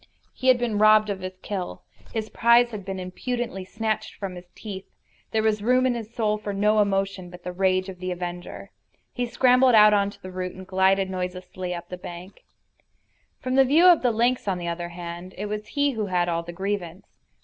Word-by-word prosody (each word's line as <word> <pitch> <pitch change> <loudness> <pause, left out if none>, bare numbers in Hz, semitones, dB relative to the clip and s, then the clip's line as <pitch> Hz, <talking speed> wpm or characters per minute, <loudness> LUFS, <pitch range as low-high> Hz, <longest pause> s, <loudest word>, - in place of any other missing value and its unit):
He 260 - -4
had 255 -1 +7
been 235 -4 -1
robbed 215 0 +6
of 195 - -4
his 185 0 -7
kill. 190 -3 -5 0.3
His 220 -1 -3
prize 235 +1 +4
had 210 -3 -6
been 190 0 -5
impudently 195 +2 -4
snatched 215 +3 -3
from 195 -2 -5
his 180 0 -11
teeth. 195 -3 -8 0.4
There 220 -1 0
was 215 -1 +1
room 250 +4 +3
in 255 - +2
his 230 -2 -6
soul 215 -2 0
for 205 -1 -4
no 210 +2 +3
emotion 195 -2 -1
but 175 0 -12
the 180 - -4
rage 185 0 +1
of 185 -2 -8
the 185 0 -4
avenger. 175 0 -6 0.4
He 245 -1 -2
scrambled 250 0 +4
out 210 -1 +8
on 200 -1 +3
to - - -14
the 185 - -9
root 185 0 -4
and 190 0 -9
glided 190 0 +2
noiselessly 180 0 -4
up 175 0 -8
the 180 - -6
bank. 180 +2 -10 1.0
From 255 0 -2
the - - +2
point 265 - +3
of 285 - +2
view 340 +3 +7
of 355 -3 +7
the 250 - +3
lynx, 235 +1 +1
on 190 -2 0
the 175 -1 -5
other 170 0 -3
hand, 175 +1 -8
it 205 - -3
was 210 0 -4
he 285 +3 +1
who 220 -5 -3
had 180 -2 +1
all 170 -1 0
the 170 +1 -8
grievance. 190 0 -5
195 Hz, 220 wpm, -25 LUFS, 180-220 Hz, 1.0 s, out